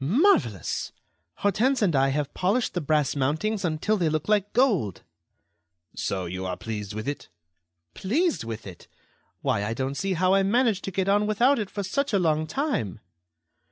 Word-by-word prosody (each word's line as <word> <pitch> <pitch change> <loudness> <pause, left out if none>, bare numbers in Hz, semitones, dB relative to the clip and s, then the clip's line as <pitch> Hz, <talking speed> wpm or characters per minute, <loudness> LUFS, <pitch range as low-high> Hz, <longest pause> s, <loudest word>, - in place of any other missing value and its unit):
"Marvellous! 160 - +2 0.4
Hortense 235 +5 +1
and 175 -7 +2
I 135 0 +3
have 145 +1 -2
polished 205 +7 0
the 180 - -1
brass 150 -2 +1
mountings 160 +10 0
until 175 +6 0
they 170 -4 +1
look 155 0 -2
like 210 -1 +2
gold." 205 - +1 0.9
"So 95 -2 -2
you 90 +2 -5
are 90 -1 -3
pleased 105 -2 -5
with 110 +3 -5
it?" 145 - -4 0.6
"Pleased 310 - 0
with 115 -1 -6
it! 90 -3 -11 0.6
Why, 100 - +1
I 110 +2 -2
don't 130 +2 -2
see 190 +7 -1
how 185 +2 +2
I 195 - +4
managed 215 0 +2
to 195 - -4
get 190 +1 -1
on 205 +1 +3
without 235 +6 +3
it 205 -3 -3
for 200 - -4
such 275 +7 -1
a - - +5
long 155 -3 +1
time." 210 - -2
180 Hz, 175 wpm, -26 LUFS, 135-215 Hz, 0.9 s, a